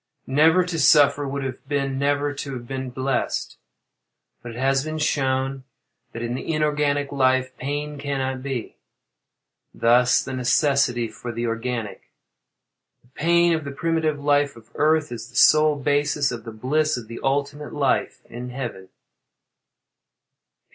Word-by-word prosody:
Never 160 +6 +4
to 175 -3 -3
suffer 145 -1 +5
would 140 0 -3
have 130 0 -6
been 135 -2 -1
never 145 +1 +1
to 140 0 -6
have 120 -2 -7
been 130 0 -4
blessed. 130 0 -2 0.8
But 120 -1 -8
it - - -9
has 135 +1 +1
been 155 0 -4
shown 135 -3 0 0.5
that, 115 - -6
in 120 0 -2
the 130 - -4
inorganic 145 -2 0
life, 130 -1 +1
pain 145 +1 -4
cannot 135 -2 -2
be 130 -4 -5 1.0
thus 125 +2 +4
the - - -6
necessity 125 -1 +2
for 115 +2 -7
the 115 +1 -3
organic. 115 -2 -4 0.9
The 120 - -27
pain 170 +5 +3
of 160 -1 -1
the 140 - -5
primitive 160 0 -1
life 145 0 +2
of 115 -1 -17
Earth, 155 -2 +2
is 115 -1 -7
the 120 - -19
sole 155 0 +5
basis 145 0 +1
of 115 -2 -7
the 115 - -6
bliss 150 +7 0
of 115 -3 -8
the 115 +1 -8
ultimate 145 +2 -2
life 140 -3 0
in 125 +1 -8
Heaven. 120 -7 -6
135 Hz, 150 wpm, -23 LUFS, 125-145 Hz, 1.0 s, suffer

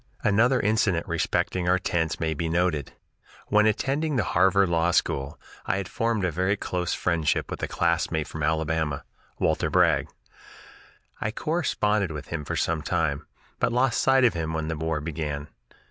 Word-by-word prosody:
Another 120 +5 +3
incident 100 -5 +1
respecting 90 -1 0
our 90 - +4
tents 80 -3 -1
may 80 -1 0
be 80 +2 -3
noted. 85 -4 0 0.6
When 105 +1 +4
attending 140 +7 0
the 115 - +2
Harvard 95 +2 +3
Law 85 0 +2
School, 70 -4 0 0.3
I - - +1
had 100 -2 -3
formed 115 -2 -1
a 90 - 0
very 95 +5 0
close 90 -3 -2
friendship 80 -4 0
with - - -5
a - - -1
classmate 85 -2 0
from 80 - -7
Alabama, 80 -1 0 0.3
Walter - - +1
Bragg. - - +3 1.1
I - - -1
corresponded 110 - 0
with 75 -1 -7
him 80 -3 -4
for - - -3
some 80 -2 0
time, 80 -4 -1 0.3
but - - +1
lost 125 0 +2
sight 135 0 +4
of 120 - +4
him 80 -1 -3
when 80 0 -2
the 80 - -2
war 80 0 -2
began. 75 -2 -4
85 Hz, 165 wpm, -26 LUFS, 80-105 Hz, 1.1 s, our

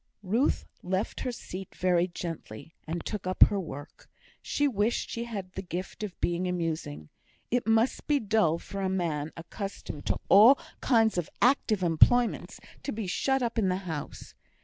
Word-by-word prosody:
'" - - -43
Ruth 225 +9 +1 0.2
left 190 +3 -2
her 255 - -2
seat 195 -5 -8
very 180 -1 +2
gently, 165 -6 -7
and 165 +1 -4
took 210 -4 -4
up 185 - +6
her 200 - +3
work. 145 -5 -9 0.3
She 290 - +1
wished 220 -2 0
she 235 0 -3
had 200 -6 -6
the 190 - -5
gift 180 +1 -6
of 210 -4 -5
being 175 +1 0
amusing; 160 - -3 0.4
it 245 -1 +1
must 225 +3 +2
be 295 -1 +3
dull 210 - +2
for 195 +3 -6
a 190 - 0
man 160 -5 -1
accustomed 170 -3 -7
to - - +1
all 220 +8 +8 0.2
kinds 225 -6 +3
of 170 - -4
active 235 -6 +3
employments 225 +9 +3 0.2
to 280 - -4
be 220 -1 -4
shut 265 +8 +1
up 235 -1 -1
in 195 -4 +2
the 180 - +1
house. 160 -5 -6
190 Hz, 170 wpm, -29 LUFS, 170-225 Hz, 0.4 s, all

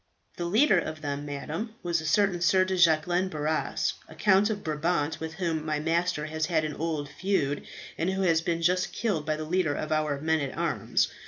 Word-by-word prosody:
"The 175 - -2
leader 210 +2 +4
of 155 -1 -5
them, 145 0 -4
madam, 160 +10 -5
was 170 -2 0
a 160 - -4
certain 195 0 +2
Sir 185 +2 +4
de 190 0 -1
Jacquelin 175 +2 +3
Barras, 155 -1 -1 0.2
a - - -12
Count 205 +1 +4
of 205 -2 -3
Brabant, 155 0 -1
with 160 0 -5
whom 165 -4 -1
my 155 -1 -1
master 165 0 0
has 155 0 -2
had 160 -3 +1
an 150 - -3
old 155 -2 -2
feud, 145 -4 -1 0.3
and 170 - +1
who 190 0 -1
has 165 -3 +3
been 165 0 -1
just 180 +2 +1
killed 180 -10 -1
by 155 - +1
the 155 - -5
leader 165 -3 +1
of 155 - -4
our 155 -2 0
men 160 +2 +1
at 140 -2 -4
arms. - - +1
160 Hz, 210 wpm, -28 LUFS, 155-180 Hz, 0.3 s, leader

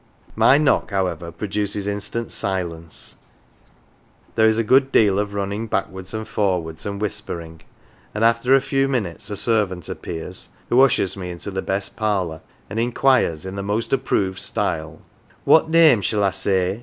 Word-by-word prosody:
My 135 - +5
knock, 150 -2 +2
however, 90 -4 -2
produces 100 +3 -3
instant 105 +3 -3
silence; 85 -4 -3 1.2
there 110 -1 +4
is 110 0 +3
a 115 - +2
good 135 +4 +4
deal 100 -5 +4
of 105 0 -3
running 100 +3 -3
backwards 95 -2 -3
and 110 0 -4
forwards, 90 -5 -1
and 100 0 -4
whispering; 85 -6 -5 0.5
and 105 - 0
after 115 +3 +4
a 135 - +4
few 135 0 +1
minutes 115 -9 -2
a 105 - -3
servant 100 -5 +2
appears, 85 +2 -6 0.2
who 125 +2 +5
ushers 125 -8 +3
me 90 -2 -6
into 90 +3 -6
the 95 0 -2
best 95 +1 -3
parlour, 95 -7 -1 0.3
and 105 +3 -4
inquires 120 - +2
in 95 +1 -6
the 100 - -3
most 110 +5 -2
approved 100 -8 0
style: 80 -1 -3 0.2
" - - -31
What 160 0 +5
name 160 -9 +6
shall 105 +1 0
I 100 - +3
say 95 +1 0
100 Hz, 165 wpm, -21 LUFS, 95-115 Hz, 1.2 s, name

